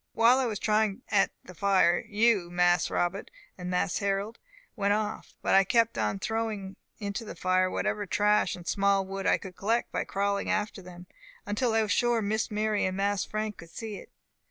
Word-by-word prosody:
While 235 +3 +5
I 260 - +1
was 215 -3 -2
trying 215 -1 0
at 200 -2 +3
the 180 - -12
fire, 185 -1 +3
you, 210 -4 +2
Mas 175 -1 +2
Robbut 175 +3 -1 0.3
and 180 -1 -6
Mas 180 0 0
Harrol, 200 +2 -1 0.4
went 200 -2 +1
off; 215 0 -3
but - - +1
I 195 - +7
kept 230 +3 +2
on 105 -2 -1
throwing 215 - -3 0.2
into 205 +1 -4
the 220 - -8
fire 185 0 +2
whatever 205 +2 -2
trash 210 0 +2
and 175 -1 -12
small 200 -1 +2
wood 195 0 -4
I - - +4
could 185 -2 -10
collect 225 +6 0
by - - -1
crawling 200 0 -1
after 210 -1 -1
them, 180 -1 -12 0.4
until 220 +3 0
I 225 - +3
was 210 - -2
sure 240 0 +2
Miss 215 +3 -1
Mary 215 0 0
and 185 0 -2
Mas 200 0 +1
Frank 215 -1 -4
would 170 - -13
see 215 +2 -6
it. - - -12
200 Hz, 195 wpm, -28 LUFS, 185-215 Hz, 0.4 s, I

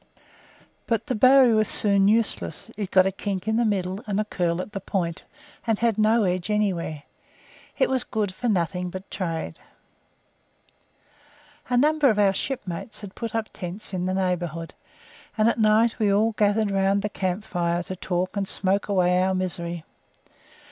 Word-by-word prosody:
But 230 -2 0
the - - -2
bowie 255 +1 +6
was 215 -1 +3
soon 200 -2 +3
useless; 225 +1 0
it 205 -3 -4
got 185 -1 +5
a 190 - +1
kink 195 0 -4
in 220 0 +1
the 240 - +3
middle, 190 -2 -1
and 205 0 -1
a 215 - 0
curl 175 -4 -1
at 185 - -5
the 200 - -4
point, 175 -3 -3 0.4
and 225 -2 +2
had 225 -1 +1
no 220 +1 +4
edge 180 0 -1
anywhere. 185 -8 -1 0.7
It - - +3
was 260 -2 0
good 210 -4 -2
for 245 +5 -2
nothing 180 -2 0
but 185 +2 -9
trade. 165 -4 -4 2.1
A 245 - +2
number 300 +1 +4
of 215 - +1
our 200 -2 +4
shipmates 210 -4 -4
had 200 -2 -9
put 230 -2 -5
up 225 -1 -2
tents 190 +3 -5
in 180 0 -1
the 185 - -1
neighbourhood, 175 -3 -2 0.6
and 215 +1 +4
at 235 - +1
night 220 +2 +3
we 210 -2 +3
all 215 +3 +3
gathered 210 0 +1
round 195 0 +1
the - - +1
camp 190 -1 -2
fire 175 -3 -1
to 185 - -6
talk 180 +1 -2
and 200 -1 -1
smoke 195 +1 0
away 180 -2 +2
our 190 0 +1
misery. 170 -2 -3
200 Hz, 175 wpm, -24 LUFS, 180-215 Hz, 2.1 s, bowie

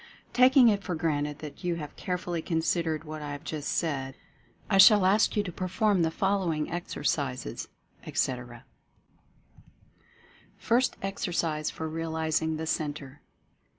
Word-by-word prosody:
Taking 255 0 +6
it 205 -2 +1
for 180 - -3
granted 150 -2 -1
that 145 +4 -10
you 175 -1 0
have 150 -3 -7
carefully 180 -2 -3
considered 160 -1 -1
what 155 -1 -7
I 145 -1 -5
have 145 - -8
just 150 -2 -4
said, 135 -5 -2 0.5
I 195 - +2
shall 205 -1 +8
ask 210 +3 +3
you 205 - +3
to 180 - -5
perform 185 +2 +1
the 165 - +2
fol 195 +4 +1
lowing 160 -5 -2
exercises, 140 -6 -3 0.4
etc.: 120 -2 -3 1.9
FIRST 245 +3 +1
EXERCISE 170 -5 -1
FOR 160 - -5
REALIZING 160 0 -1
THE 160 - -4
CENTRE. 145 -3 -4
160 Hz, 135 wpm, -28 LUFS, 150-185 Hz, 1.9 s, shall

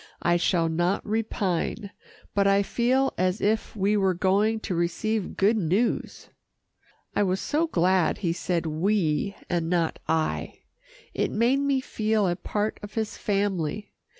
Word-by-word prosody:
I 175 0 +3
shall 170 -1 +2
not 175 +4 0
repine, 205 -3 -2 0.4
but 200 -1 +3
I 200 0 +4
feel 255 +5 +1
as 185 +3 +1
if 215 +2 0
we 205 +1 +1
were 190 -3 +2
going 200 +5 +2
to 190 - -3
receive 180 +5 -1
good 210 +4 +3
news." 200 +5 -1 0.9
I - - +2
was 190 -1 +1
so 315 +9 0
glad 185 - +2
he 170 -4 -1
said 175 -1 -2
"we" 170 +2 0
and 170 -2 -1
not 170 -2 0
"I." 160 -1 -1 0.5
It - - 0
made 240 +5 +2
me 280 -1 +1
feel 215 -4 0
a 175 - 0
part 210 +4 -2
of 205 -1 -9
his 220 -1 -2
family. 200 -2 -1
195 Hz, 150 wpm, -26 LUFS, 175-215 Hz, 0.9 s, I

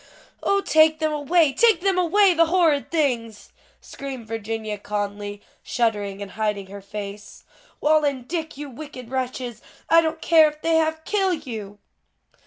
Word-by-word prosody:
"O, 400 0 +2
take 315 -3 +4
them 310 -1 -1
away! 300 0 +2
take 445 -4 +4
them 385 -1 +2
away, 370 +2 +4
the 330 -1 +4
horrid 320 -5 +2
things!" 240 -9 -1 0.3
screamed 270 -4 -8
Virginia 220 -1 -4
Conly, 205 0 -4 0.2
shuddering 205 -4 -1
and 200 - -10
hiding 210 -2 -2
her 200 0 -8
face. 205 0 -8 0.4
"Wal 310 0 +4
and 265 -4 -1
Dick, 320 -2 -4
you 295 0 -6
wicked 260 -2 -10
wretches, 250 -2 -4 0.3
I 330 0 +8
don't 320 0 -2
care 320 -1 +6
if 300 0 -16
they 330 0 +3
half 315 0 0
kill 385 -3 +1
you." 220 -9 -8
280 Hz, 155 wpm, -23 LUFS, 215-320 Hz, 0.4 s, I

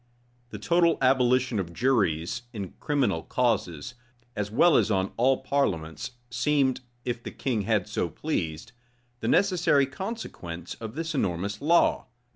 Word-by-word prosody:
The 105 - -7
total 170 - +3
abolition 130 -3 +3
of 85 -3 -4
juries 100 -5 +1
in 100 -5 -5
criminal 135 - 0
causes, 105 - -1 0.4
as 105 -1 -2
well 150 +10 +4
as - - +3
on 95 -2 0
all 130 +3 +2
parliaments, 95 - -1 0.2
seemed, 130 0 +1 0.2
if 120 -1 -2
the - - -6
king 125 -6 -2
had 105 -5 +2
so 85 - -1
pleased, 80 - -3 0.5
the - - -3
necessary 175 -8 +3
consequence 130 - -6
of 110 +1 -7
this 165 +1 -3
enormous 100 - -2
law. 165 0 +3
120 Hz, 135 wpm, -27 LUFS, 95-140 Hz, 0.5 s, well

